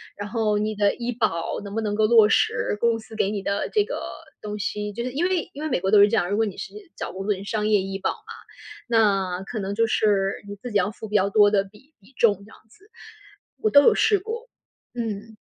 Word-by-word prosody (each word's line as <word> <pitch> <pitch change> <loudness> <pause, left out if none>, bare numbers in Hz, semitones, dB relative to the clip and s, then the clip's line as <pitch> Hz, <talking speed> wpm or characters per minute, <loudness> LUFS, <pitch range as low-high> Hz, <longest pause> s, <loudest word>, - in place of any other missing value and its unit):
然 205 - -6
后 215 -2 0
你 215 +1 -1
的 205 -1 +1
医 240 0 -3
保 220 -8 -1
能 200 0 -8
不 225 - 0
能 210 -2 -2
够 215 +1 +2
落 225 -2 +6
实， 210 - +1
公 235 0 +2
司 220 0 -12
给 195 - +1
你 205 -2 -3
的 200 0 -1
这 420 - +3
个 475 +4 -5 0.5
东 210 0 -5
西。 210 0 -3
就 235 +3 -4
是 250 - -3
因 295 +7 -1
为 370 -3 -1
因 285 - -8
为 310 - -2
美 245 - 0
国 190 - 0
都 210 - +7
是 205 - +8
这 220 - 0
样， 180 -5 +1
如 205 - 0
果 225 - +2
你 205 - -5
是 - - -7 0.2
找 - - -5
工 190 +1 -6
作 210 - +2
人 195 0 -8
商 210 0 -1
业 210 -2 +3
医 195 0 -5
保 195 - 0
嘛， - - -9 0.7
那 195 -5 +2
可 220 +3 -5
能 200 0 -3
就 230 +2 +3
是 200 -3 +1
你 205 - -7
自 235 +5 -8
己 210 - +2
要 200 0 +1
付 220 +1 -9
比 210 - -4
较 200 -1 +3
多 205 0 +5
的 200 -2 +3
比 215 +10 -20
比 205 +7 -22
重 220 -3 +4
这 - - -17
样 - - -16
子。 395 - -23 0.7
我 435 - +2
都 285 -7 +7
有 455 - +6
试 410 -2 +3
过。 455 +5 -6 0.5
嗯。 225 -2 -5
210 Hz, 280 characters per minute, -24 LUFS, 200-235 Hz, 0.7 s, 是